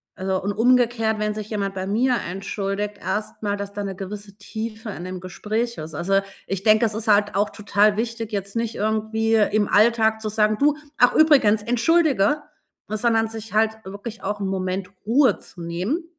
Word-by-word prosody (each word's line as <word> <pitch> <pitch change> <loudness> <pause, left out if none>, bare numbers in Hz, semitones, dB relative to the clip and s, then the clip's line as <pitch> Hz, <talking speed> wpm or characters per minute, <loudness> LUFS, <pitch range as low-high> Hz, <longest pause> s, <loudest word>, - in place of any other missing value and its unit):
Also, 190 0 -2
und 200 - 0
umgekehrt, 230 -2 +2
wenn 210 0 0
sich 215 0 -6
jemand 200 -2 -2
bei 190 0 -3
mir 245 +5 +2
entschuldigt, 195 +2 -3
erst 200 +4 -4
mal, 205 -1 -1
dass 200 0 -6
da 205 - -4
'ne 195 -2 -4
gewisse 200 +1 -8
Tiefe 220 +1 -6
in 180 - -7
dem 185 0 -5
Gespräch 220 +5 -3
ist. 155 +1 -7
Also, 195 +3 +1 0.3
ich 195 0 -3
denke, 215 +1 +5
das 220 - -1
ist 225 +1 -4
halt 205 -1 +3
auch 205 +1 +2
total 210 0 +2
wichtig, 230 -1 -3
jetzt 200 0 -4
nicht 230 0 -2
irgendwie 220 +1 0
im 210 -1 +2
Alltag 220 0 +3
zu 215 - -2
sagen: 215 0 +2
„Du, 295 +1 +3 0.2
ach 245 - +5
übrigens, 255 -10 +5
entschuldige“, 290 +1 +2 0.4
sondern 225 +1 +1
sich 225 -1 -8
halt 220 +1 +2
wirklich 205 +4 -8
auch 205 +1 -3
'n 195 - -1
Moment 185 0 -2 0.2
Ruhe 240 0 +3
zu 175 - -12
nehmen 180 - -2
215 Hz, 185 wpm, -23 LUFS, 200-225 Hz, 0.4 s, denke